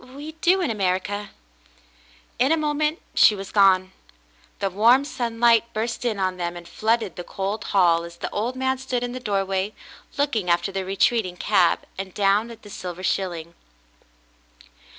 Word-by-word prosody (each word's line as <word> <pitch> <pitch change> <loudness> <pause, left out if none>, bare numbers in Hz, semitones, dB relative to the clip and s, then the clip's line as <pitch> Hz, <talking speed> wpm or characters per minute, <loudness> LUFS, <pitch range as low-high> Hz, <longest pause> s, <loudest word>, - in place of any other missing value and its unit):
We 295 +3 -7
do 370 +2 +4
in 345 - 0
America." 200 0 -1 1.1
In 260 +4 +3
a 325 - +4
moment 305 +1 0
she 210 - +6
was 195 -1 -8
gone. 190 -2 +4 0.7
The 195 -1 -2
warm 235 +8 +4
sunlight 235 -3 +2
burst 230 +3 -2
in 225 -4 0
on 185 -1 -1
them 175 -1 -3
and 170 0 -11
flooded 220 0 -1
the 175 - -5
cold 200 +4 -4
hall 170 -4 +3
as 170 0 -10
the - - -4
old 235 +5 -2
man 260 0 -1
stood 255 -2 -2
in 245 - -3
the 255 - -5
doorway 195 -3 -1 0.4
looking 240 -10 0
after 175 +3 +1
the 190 -1 -3
retreating 195 -1 +1
cab, 185 -4 +3 0.2
and 190 -1 -6
down 205 +3 +2
at 230 - -12
the 205 - -12
silver 180 -1 -7
shilling. 170 -4 -2
205 Hz, 165 wpm, -23 LUFS, 185-240 Hz, 1.1 s, she